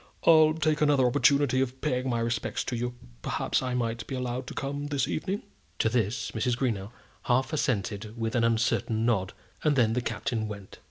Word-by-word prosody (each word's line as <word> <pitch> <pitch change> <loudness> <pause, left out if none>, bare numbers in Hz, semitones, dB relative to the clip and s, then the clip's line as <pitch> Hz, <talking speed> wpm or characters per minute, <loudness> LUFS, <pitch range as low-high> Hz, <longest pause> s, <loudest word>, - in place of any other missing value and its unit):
"I'll 155 -1 +6
take 155 -1 +1
another 145 -3 +4
opportunity 135 +1 +3
of 130 0 -2
paying 130 -3 -1
my 120 -1 0
respects 115 -1 -1
to 125 - -3
you. 120 +1 -3 0.3
Perhaps - - 0
I 130 -1 -2
might 115 -2 -2
be 135 - -4
allowed 125 0 -3
to - - -7
come 140 +1 -3
this 140 -3 0
evening?" 190 +5 -2 0.3
To 115 - +2
this 115 -1 -1
Mrs. 120 +2 0
Greenow 110 -7 -1 0.4
half 130 +5 +1
assented 105 -5 -1
with 115 0 -1
an 120 -2 +2
uncertain 115 -1 +1
nod, 100 -6 +1 0.3
and 150 -2 +3
then 115 -4 +3
the 125 - 0
Captain 115 -1 -2
went. 100 -2 -9
125 Hz, 185 wpm, -28 LUFS, 115-135 Hz, 0.4 s, I'll